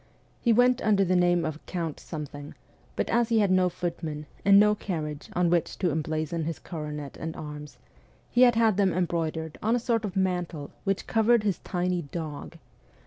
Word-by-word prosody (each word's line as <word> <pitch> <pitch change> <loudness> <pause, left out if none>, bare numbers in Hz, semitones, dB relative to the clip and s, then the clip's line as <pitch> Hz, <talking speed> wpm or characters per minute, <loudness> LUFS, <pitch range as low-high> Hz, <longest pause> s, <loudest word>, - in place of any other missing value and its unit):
He 235 - +3
went 245 +2 +4
under 200 -2 +3
the 185 +1 +2
name 175 -1 +3
of 155 0 -5
Count 165 -4 -3
Something; 145 -2 -7 0.4
but - - -1
as 235 0 +2
he 230 - +3
had 205 -3 +3
no 185 -1 +4
footman 165 -4 -4 0.2
and 200 0 +7
no 210 0 +5
carriage 155 -8 -5
on 175 -1 +2
which 170 -2 0
to 180 -3 +1
emblazon 155 +2 -2
his 165 -1 -3
coronet 150 -4 -6
and 160 0 -5
arms, 150 -1 -8 0.5
he 245 - +3
had 245 -2 +7
had 225 -3 +3
them 195 -3 +3
embroidered 160 -2 -2
on 225 +3 +2
a - - +1
sort 230 -1 0
of 200 -4 -4
mantle 180 -6 -1
which 195 -1 0
covered 225 0 +3
his 200 -4 0
tiny 180 -1 -1
dog. 155 +1 -7
175 Hz, 185 wpm, -27 LUFS, 155-205 Hz, 0.5 s, and